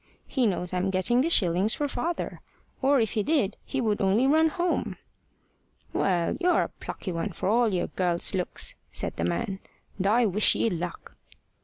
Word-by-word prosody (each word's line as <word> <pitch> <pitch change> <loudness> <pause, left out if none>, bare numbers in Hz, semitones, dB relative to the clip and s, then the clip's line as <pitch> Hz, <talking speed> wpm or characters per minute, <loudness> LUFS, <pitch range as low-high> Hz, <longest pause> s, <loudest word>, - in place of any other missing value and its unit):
"He 255 -4 +1
knows 180 -2 -2
I'm 185 +1 0
getting 190 +7 +2
the 320 - +1
shillings 190 - +3
for 295 - -1
father. 325 +6 -3 0.4
Or 275 0 +4
if 220 -2 +1
he 215 - 0
did 255 -6 +1
he 270 - -3
would 215 -4 0
only 200 +6 +3
run 315 +4 +4
home." 350 +1 -1 1.0
"Well, 175 -3 +1
you're 360 -1 +3
a - - -5
plucky 185 - -7
one, 165 -1 -3
for - - -3
all 230 +2 +3
your 180 - 0
girl's 175 -1 0
looks!" 185 -2 -2 0.2
said - - -2
the 85 - -1
man; 85 - -2 0.4
"and 190 - +1
I 235 +4 +4
wish 210 +1 +3
ye 230 - +1
luck." 175 0 -5
210 Hz, 180 wpm, -27 LUFS, 185-260 Hz, 1.0 s, Or